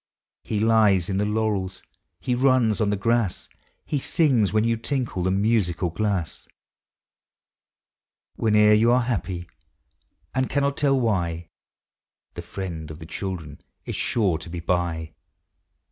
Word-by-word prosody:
He 105 - -2
lies 105 -5 +3
in 95 - -1
the 105 - +1
laurels, 105 -4 -1 0.4
he 125 - -1
runs 125 -4 +3
on 105 - +2
the 105 - 0
grass, 115 -1 0 0.4
He 145 - -1
sings 130 - +2
when 110 0 +2
you 115 0 +2
tinkle 120 -4 -2
the 90 - +1
musical 95 -4 +1
glass; 95 -3 -2 1.9
Whene'er 105 -1 +4
you 115 +3 +4
are 125 0 +3
happy 95 -7 -3 0.9
and 130 0 0
cannot 140 0 0
tell 135 -2 +2
why, 85 -8 -1 0.8
The 85 - -6
Friend 85 -3 -6
of 75 - -8
the 80 - -10
Children 80 -5 -6 0.2
is - - -4
sure 95 -9 +1
to 85 - -9
be 85 0 -5
by! 85 -2 -2
105 Hz, 135 wpm, -24 LUFS, 90-115 Hz, 1.9 s, Whene'er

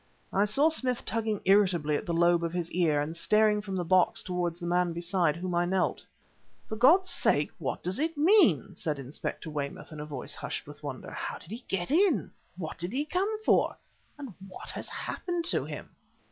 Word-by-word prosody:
I 200 +2 +3
saw 275 +10 +4
Smith 255 -6 0
tugging 220 -2 -1
irritably 185 -6 +3
at - - -3
the 170 - -1
lobe 170 0 +3
of 165 0 -2
his 175 -2 -3
ear, 160 -4 +2
and 150 +3 -3
staring 210 +3 +3
from 195 -2 -5
the 180 - -1
box 185 +1 +3
towards 175 -2 -2
the 175 - -6
man 175 0 +1
beside 170 -2 +1
whom 180 +1 -4
I 175 0 +2
knelt. 185 +1 0 0.6
"For 220 - -5
God's 320 - +5
sake, - - +2
what - - -3
does 185 +5 -1
it 320 +1 -1
man?" 310 - +4
said 150 -3 -2
Inspector 135 +4 -5
Weymouth 145 0 -5
in 155 - -8
a 150 - -5
voice 140 -4 -5
hushed - - -5
with - - -12
wonder. - - -6
"How - - -4
did 175 - -14
he 240 +3 -7
get 185 +4 -2
in? 355 0 +3 0.3
What 160 -4 -6
did 175 +5 -4
he 285 +3 0
come 365 +6 0 0.2
for? - - +3 0.4
and 275 -7 -8
what 185 - -9
has - - -6
happened 350 -2 -3
to 345 - +1
him?" - - -8
185 Hz, 200 wpm, -29 LUFS, 170-245 Hz, 0.6 s, God's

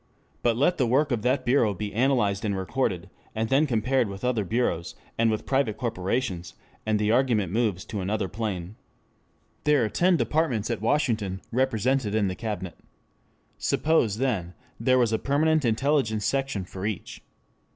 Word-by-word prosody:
But 115 -2 +2
let 165 +7 +2
the 125 - +3
work 140 +5 +2
of 120 -3 0
that 130 +3 +1
bureau 120 -5 +3
be 105 +2 -5
analysed 115 -4 +1
and 100 -3 -1
recorded, 95 -3 -1 0.3
and 110 0 -1
then 140 +3 +3
compared 125 0 +1
with 100 +4 -6
other 120 -4 +1
bureaus 95 -5 -1 0.2
and 115 0 +2
with 110 -1 -2
private 135 -6 +1
corporations, 95 -4 -2 0.3
and 110 -1 +2
the 105 +1 +1
argument 115 -7 +2
moves 105 -4 0
to 105 - -4
another 100 +1 -1
plane. 100 -3 -4 0.9
There 145 -5 +3
are - - -2
ten 175 - +3
departments 130 -11 0
at 115 - -3
Washington 110 -7 0
represented 130 -2 +1
in 105 -3 +2
the 95 - -4
Cabinet. 105 -5 -5 0.8
Suppose, 135 -10 +2
then, 110 -9 -1 0.2
there 130 -1 +3
was 120 -3 +2
a 110 - +1
permanent 155 +2 +2
intelligence 115 -3 +1
section 135 -5 -1
for 95 +1 -8
each. 105 -5 -5
115 Hz, 160 wpm, -26 LUFS, 100-130 Hz, 0.9 s, the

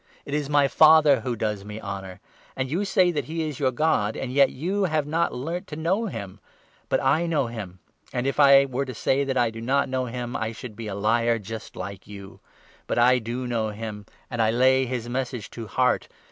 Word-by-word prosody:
It 140 - -6
is 145 -1 -1
my 145 -1 +4
Father 155 -2 +6
who 120 +1 -3
does 105 -2 -2
me 105 +1 -7
honour 100 -2 -7 0.2
— - - -28
and 130 0 -2
you 185 +6 0
say 185 -2 +3
that 155 - -2
he 160 0 -3
is 145 -4 -6
your 135 -3 +2
God; 120 -6 +1
and 130 -1 -4
yet 140 0 +5
you 190 +8 -1
have 155 -4 0
not 160 +3 0
learnt 165 +9 -4
55 150 - -6
to 160 - -7
know 195 +7 +1
him; 100 - -7 0.5
but - - +2
I 170 +2 +2
know 155 -5 +1
him; 105 -6 -7 0.3
and, 125 - -2
if 140 +2 -1
I 140 -1 +7
were 135 +1 -2
to 130 -2 -7
say 135 +4 +1
that 135 -1 -2
I 120 -2 +2
do 115 0 -8
not 140 +3 +1
know 130 0 -1
him, 120 0 -5
I 110 0 -2
should 115 -1 -9
be 115 0 -7
a 100 - -4
liar 115 +3 +1 0.4
like 100 -1 -7
you; 100 -1 -11 0.5
but - - -1
I 125 +1 +5
do 120 +2 -4
know 115 -3 -1
him, 105 -1 -7 0.2
and 120 -2 -2
I 110 - +3
lay 130 +3 +3
his 120 -2 -3
Message 125 -3 -4
to 115 -2 -7
heart. 125 +3 +1
125 Hz, 230 wpm, -25 LUFS, 110-145 Hz, 0.5 s, I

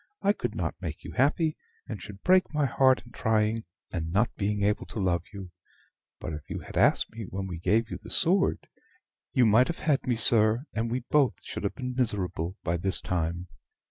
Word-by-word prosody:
I 200 - +4
could - - -4
not - - -2
make - - -6
you - - -7
happy, 155 +4 +2 0.3
and 105 -5 -6
should 100 +1 -10
break 185 +1 +4
my 150 -2 +1
heart 130 -1 +3
in 120 - -15
trying, 110 0 0 0.3
and 80 -2 -3
not 105 +6 +2
being 105 0 -1
able 105 +1 0
to 110 - -5
love 90 -3 +1
you. 95 -3 -9 0.7
But 80 - -5
if 75 -1 -8
you - - -3
had - - -11
asked - - +4
me 110 -1 -7
when 95 +1 -4
we 90 -3 -6
gave 110 +7 +1
you - - -5
the - - -11
sword, 190 +1 +2 0.6
you 125 - +4
might 115 +4 +5
have 170 - -3
had 145 -5 0
me, 125 - +2
sir, 110 +1 +4
and 115 +1 -1
we 125 +2 -1
both 145 -4 +4
should - - -6
have 100 - -2
been 125 -2 -4
miserable 95 -7 -1
by 85 0 0
this 95 +2 -2
time. 85 0 -2
110 Hz, 205 wpm, -28 LUFS, 95-130 Hz, 0.7 s, might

